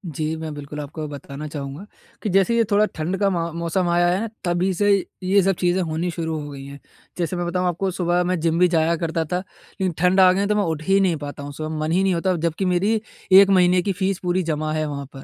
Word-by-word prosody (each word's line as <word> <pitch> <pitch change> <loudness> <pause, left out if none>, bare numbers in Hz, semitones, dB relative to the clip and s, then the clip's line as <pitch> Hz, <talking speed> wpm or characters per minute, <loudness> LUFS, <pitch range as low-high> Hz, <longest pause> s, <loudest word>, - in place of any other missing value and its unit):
जी, 155 0 -2
मैं 160 -1 -6
बिल्कुल 145 +1 -7
आपको 150 +1 -6
बताना 145 +1 -7
चाहूँगा। 145 +4 -6 0.4
कि 210 - -1
जैसे 195 +5 +3
ये 230 - +4
थोड़ा 210 +1 +4
ठंड 170 +5 -2
का 200 -1 +3
म 170 -2 -2
मौसम 170 +2 0
आया 175 0 +3
है, 190 +6 0 0.2
तभी 180 +2 0
से 205 +3 +1 0.3
ये 195 +2 +4
सब 195 -1 +2
चीज़ें 180 +1 +1
होनी 165 +1 -2
शुरू 160 -2 -3
हो 145 0 -7
गई 135 -1 -9
हैं। 140 0 -10 0.4
जैसे 175 0 -2
मैं 175 0 -2
बताऊँ 180 +1 0
आपको 185 +3 -1
सुबह 175 -1 +1
मैं 180 -1 -1
जिम 165 +1 +1
भी 180 - +6
जाया 165 -1 +2
करता 165 0 -1
था 180 +3 -2
लेकिन 185 0 -6
ठंड 180 +3 +3
आ 185 -1 +7
गई 200 +2 0
तो 210 - +1
मैं 210 - +2
उठ 160 -4 -2
ही 195 +3 +3
नहीं 185 -4 +2
पाता 145 -1 -7
हूँ, 145 - -6
सुबह 155 +1 -5
मन 155 +1 -1
ही 185 +3 +2
नहीं 190 -1 +2
होता 175 +2 0
और 180 - +1
जब 165 0 -1
की 190 - +1
मेरी 200 +5 +1 0.3
1 195 +1 +8
महीने 180 -1 +4
की 200 - -1
फीस 190 0 -1
पूरी 180 +1 0
जमा 155 -1 -2
है 155 0 -1
वहाँ 140 -1 -5
पर। 135 - -9
175 Hz, 260 wpm, -22 LUFS, 155-190 Hz, 0.4 s, 1